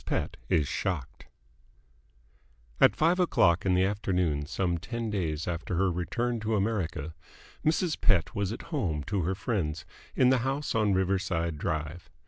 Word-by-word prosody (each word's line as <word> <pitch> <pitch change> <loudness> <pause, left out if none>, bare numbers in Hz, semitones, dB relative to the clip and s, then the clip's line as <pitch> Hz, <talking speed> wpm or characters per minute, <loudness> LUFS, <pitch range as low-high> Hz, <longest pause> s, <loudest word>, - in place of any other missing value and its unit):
PETT - - -2
IS 75 -4 +2
SHOCKED 85 -6 -3 1.5
At - - +6
five 170 +4 +3
o'clock 90 - +3
in 90 - +4
the 90 - +4
afternoon 90 -7 0
some 85 0 -1
ten 115 +4 -4
days 80 -6 -2
after 85 +1 -3
her 95 +2 +2
return 120 +7 -1
to 110 +1 -1
America, 90 -7 -1 0.5
Mrs. 160 +1 +1
Pett 100 -9 +3
was 100 -1 -1
at 115 - -6
home 85 - -1
to 100 +6 -1
her 90 +3 -1
friends 85 -8 -2 0.3
in 125 - +5
the 130 -1 +4
house 135 +4 -1
on 105 -3 +2
Riverside 90 -4 0
Drive. 80 +1 -3
95 Hz, 150 wpm, -29 LUFS, 85-115 Hz, 1.5 s, At